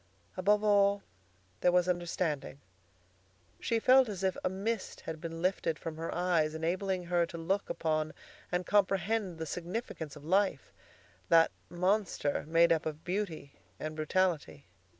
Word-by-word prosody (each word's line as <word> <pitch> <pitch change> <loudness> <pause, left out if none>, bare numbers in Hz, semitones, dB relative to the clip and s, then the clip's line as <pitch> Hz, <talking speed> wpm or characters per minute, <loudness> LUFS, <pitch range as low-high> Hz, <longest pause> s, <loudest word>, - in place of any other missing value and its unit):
Above 205 +3 +3
all, 200 -1 +4 0.6
there 180 - +4
was 180 0 +3
understanding. 170 -6 -2 1.0
She 230 - 0
felt 255 +2 +5
as 195 -2 -5
if 190 -1 +1
a - - +2
mist 200 +3 -3
had 160 -1 -6
been 165 0 -5
lifted 180 -4 0
from 160 0 -6
her 165 +1 -4
eyes, 170 -3 +1
enabling 180 +3 -1
her 175 -1 +1
to 170 - -8
look 190 +5 -1
upon 155 -1 -1 0.4
and 180 0 0
comprehend 195 -1 +1
the 160 - -4
significance 175 - -5
of 150 0 -12
life, 190 -3 +1 0.6
that 165 -1 +6 0.2
monster 180 -5 0
made 165 +1 +5
up 160 -1 -1
of 155 0 -6
beauty 175 -7 -3 0.3
and 155 0 -4
brutality. 155 - 0
175 Hz, 145 wpm, -31 LUFS, 160-195 Hz, 1.0 s, that